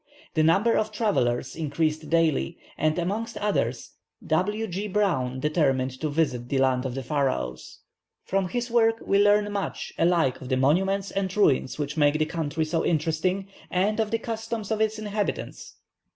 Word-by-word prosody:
The 160 - +2
number 195 +9 +4
of 215 0 0
travellers 130 - 0
increased 155 0 -1
daily, 160 - +1 0.2
and 155 +1 +1
amongst 210 +6 -2
others 130 - -1 0.3
W. 205 +7 0
G. 200 +1 -4
Browne 170 -11 0
determined 135 -3 +1
to 155 - 0
visit 135 -6 -1
the 140 - 0
land 130 -1 +2
of 125 - -5
the 135 - -4
Pharaohs. 130 - -2 0.4
From 195 -1 0
his 240 +2 -3
work 225 -1 +4
we 200 - +3
learn 205 0 +3
much 200 -1 -4
alike 165 -6 +2
of 130 - -8
the 130 - +1
monuments 190 +9 +2
and 195 0 -2
ruins 140 -10 +2
which 150 +1 -3
make 145 0 +4
this 155 0 +1
country 160 -1 -1
so 165 +1 -1
interesting, 170 +4 0 0.2
and 205 +4 +1
of 220 -1 +1
the 230 - +1
customs 225 -1 -4
of 220 0 0
its 220 0 +1
inhabitants. 210 -1 -4
165 Hz, 165 wpm, -26 LUFS, 145-205 Hz, 0.4 s, number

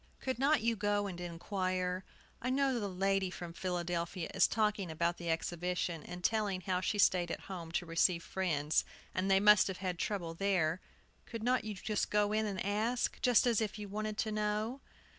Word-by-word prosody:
"Could 260 -2 -3
not 280 -1 +4
you 230 +1 +1
go 205 0 +1
and 180 -3 -5
inquire? 185 +1 -2 0.4
I 255 - -1
know 265 -1 +2
the 205 -2 -2
lady 195 0 +1
from 175 -2 -7
Philadelphia 175 -1 -2
is - - +5
talking 210 -4 0
about 170 +2 0
the 170 -1 -5
Exhibition, 175 0 -1
and 180 +3 -8
telling 205 -4 +1
how 180 0 -1
she 205 - 0
stayed 180 -3 +4
at - - -4
home 175 -4 -7
to 175 - 0
receive 170 +1 +2
friends. 155 -5 0 0.3
And 185 +1 0
they 195 0 +5
must 210 0 +6
have 190 -2 -4
had 180 -3 -3
trouble 175 -6 -2
there! 180 -2 +1 0.5
Could 230 -2 -6
not 250 -1 +2
you 215 -1 -4 0.3
go 210 0 +2
in 215 0 +1
and 190 -2 -3
ask, 220 +5 0
just 245 -1 +5
as 235 -3 +3
if 215 -1 -2
you 210 -1 -6
wanted 215 +1 -3
to 220 -1 -1
know?" 215 +4 -1
195 Hz, 190 wpm, -34 LUFS, 175-215 Hz, 0.5 s, must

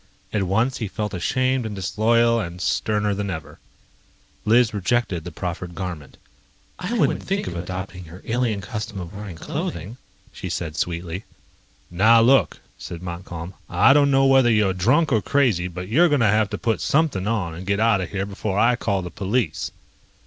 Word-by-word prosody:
At 105 - +1
once, 110 +8 +1
he 110 - -2
felt 105 +1 -4
ashamed 130 +7 0
and 110 -2 -5
disloyal 115 +5 +2
and 90 -4 -5
sterner 105 +2 0
than 100 0 -3
ever. 80 -5 -7 0.9
Liz 115 +1 +4
rejected 100 -3 0
the 90 - -7
proffered 85 +1 -5
garment. 90 -6 -6 0.6
"I 180 +6 -3
wouldn't 240 - +1
think 195 +1 -2
of 85 - -5
adopting 90 +1 -6
your 85 +4 -12
alien 115 -3 0
custom 105 +2 -5
of 90 +1 -7
wearing 100 -3 -7
clothing," 85 +6 -5 0.4
she - - -6
said 80 -3 -3
sweetly. 85 +3 -3 0.7
"Now 110 +6 +5
look," 130 +4 +3 0.2
said 85 0 -8
Montcalm, 85 0 -6 0.2
"I 135 - +5
don't 145 -1 +4
know 135 0 +4
whether 135 -2 +5
you're 105 -4 +3
drunk 130 - +2
or 110 -4 +3
crazy, 115 -12 +2
but 90 +1 -7
you're 165 - +4
going 145 -4 +2
to - - +4
have 105 0 +3
to - - -4
put 115 -2 -1
something 140 - +1
on 100 -7 -1
and 90 +3 -8
get 100 +1 +1
out 110 -3 +3
of 90 - -4
here 100 -1 -2
before 100 0 -3
I 120 +3 +4
call 100 -5 -1
the 90 - -6
police." 105 - -1
100 Hz, 180 wpm, -23 LUFS, 90-115 Hz, 0.9 s, Now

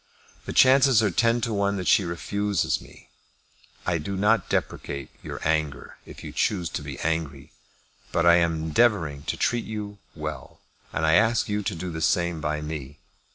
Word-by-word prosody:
The - - -4
chances 130 -3 +5
are 105 - +2
ten 115 +6 +2
to 115 0 -1
one 100 0 0
that 90 - -4
she 100 - +5
refuses 100 +3 -1
me. - - -16 0.8
I 85 -2 0
do 95 +6 -4
not 105 +1 +2
deprecate 70 -1 -3
your - - -7
anger, 80 -2 -2
if - - -11
you - - -7
choose 90 -6 0
to - - -4
be - - -7
angry. 75 -3 -3 0.6
But 85 - +1
I 85 0 +7
am 85 -1 +2
endeavouring 80 -5 +2
to - - -2
treat 120 -1 0
you 105 -2 -6 0.2
well, 75 -2 -7 0.3
and 80 - -1
I 80 - +4
ask 110 +5 +3
you 105 0 0
to 100 -2 -3
do 90 +2 -5
the 80 0 -5
same 85 +1 +1
by 75 0 -2
me. 75 -2 -6
85 Hz, 180 wpm, -25 LUFS, 80-105 Hz, 0.8 s, I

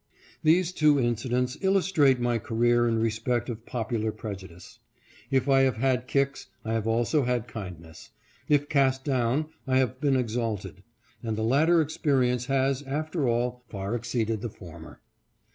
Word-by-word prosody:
These 170 +3 +3
two 150 -5 +3
incidents 125 +1 -1
illus 195 -1 +2
trate 140 -7 +4
my 120 -1 0
career 120 +2 +2
in 115 -1 +1
respect 115 +2 -1
of 115 -1 -7
popular 115 -2 -2
prejudice. 95 -5 -9 0.5
If 135 0 +1
I 135 -1 +5
have 130 -4 +2
had 130 0 0
kicks, 140 0 0 0.2
I 110 - -2
have 115 -1 -1
also 120 +6 +2
had 125 -2 -1
kindness. 90 -8 -9 0.4
If 145 -1 +3
cast 135 -3 +2
down, 135 +2 0 0.2
1 130 -1 +2
have 130 0 0
been 140 -2 +2
exalted; 115 -4 -2 0.4
and 110 -2 -3
the 110 - -1
latter 155 +8 +4
experience 130 -5 0
has, 135 0 +1
after 150 +1 -2
all, 120 +1 -1
far 100 +1 -4
exceeded 115 -2 -2
the 120 - -3
former. 85 -5 -12
125 Hz, 155 wpm, -27 LUFS, 115-135 Hz, 0.5 s, I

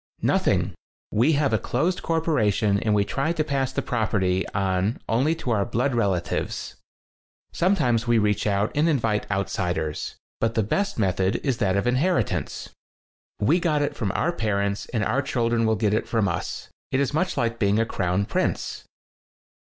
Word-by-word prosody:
"Nothing. - - +2 0.4
We 125 +9 +3
have 140 -4 +1
a 110 - +3
closed 170 +9 -1
cor 165 -1 0
poration 105 - +2
and 105 -1 +2
we 100 -1 +2
try 140 +10 -1
to 155 - 0
pass 135 -3 -1
the - - -2
prop 110 -3 -1
erty 95 -3 +1
on 95 +2 0
only 135 +8 +2
to 130 -7 -4
our 105 -3 +2
blood 120 +5 0
relatives. 100 -7 -1 0.8
Sometimes 125 - +2
we 120 -1 +4
reach 105 -1 +1
out 100 +1 +1
and 155 +3 +2
invite 115 -8 0
outsiders. 90 -5 -2 0.2
But 115 0 0
the 110 - +2
best 200 - -1
method 95 -2 +1
is 135 -5 0
that 100 -4 +2
of 100 - 0
inheritance. 140 +9 0 0.7
We 155 - +3
got 155 -4 +1
it 145 - -2
from 105 -5 -1
our 175 - +1
parents, 100 -7 -1
and 115 -3 -1
our 125 +6 +1
children 115 -3 0
will 110 - +3
get 105 0 +1
it 110 - 0
from 110 -3 +1
us. 85 - -4 0.2
It's 135 +1 +1
much 180 +3 0
like 115 -2 0
being 100 -1 +2
a 115 - +2
crown 95 -1 0
prince." - - -2
115 Hz, 175 wpm, -24 LUFS, 100-140 Hz, 0.8 s, we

